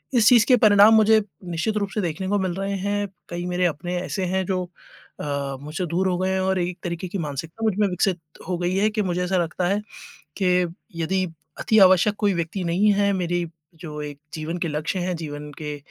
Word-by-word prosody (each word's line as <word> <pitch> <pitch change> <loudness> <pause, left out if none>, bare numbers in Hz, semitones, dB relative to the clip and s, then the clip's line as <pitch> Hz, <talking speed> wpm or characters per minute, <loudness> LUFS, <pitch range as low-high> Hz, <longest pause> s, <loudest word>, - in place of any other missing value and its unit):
इस 225 -3 +5
चीज़ 235 -4 +6
के 255 - +7
परिणाम 210 -1 +7
मुझे 220 0 +5 0.2
निश्चित 175 +5 -1
रूप 200 -1 -1
से 210 - +1
देखने 175 +1 -3
को 205 - +2
मिल 185 -2 -1
रहे 195 +1 -2
हैं, 205 +1 -1 0.2
कई 175 0 -4
मेरे 180 0 0
अपने 175 +3 -4
ऐसे 190 +1 -3
हैं 190 +1 0
जो 185 0 -1 0.6
अ, 140 -2 -3
मुझसे 155 +6 -4
दूर 180 +4 0
हो 180 - 0
गए 185 0 0
हैं 190 - 0
और 190 0 +1
एक 175 0 -2
तरीके 170 +1 -4
की 200 - -3
मानसिकता 160 +6 -5
मुझमें 210 -1 +2
विकसित 180 0 0 0.3
हो 180 - 0
गई 180 +1 0
है 205 +3 +3
कि 215 0 0
मुझे 180 -1 -1
ऐसा 185 +1 0
लगता 175 +1 0
है, 200 +3 +1 0.6
कि 180 -2 +2 0.4
यदि 185 +3 0 0.3
अति 220 - +3
आवश्यक 190 +2 +6
कोई 205 -2 +2
व्यक्ति 170 +2 -3
नहीं 185 +5 +3
है, 200 0 +2
मेरी 175 -2 -1 0.3
जो 150 -2 -7
एक 145 -1 -7 0.2
जीवन 160 +2 -4
के 170 - -2
लक्ष्य 155 +5 -2
हैं, 180 0 -1
जीवन 150 -2 -6
के 150 -1 -5
180 Hz, 215 wpm, -23 LUFS, 170-200 Hz, 0.6 s, के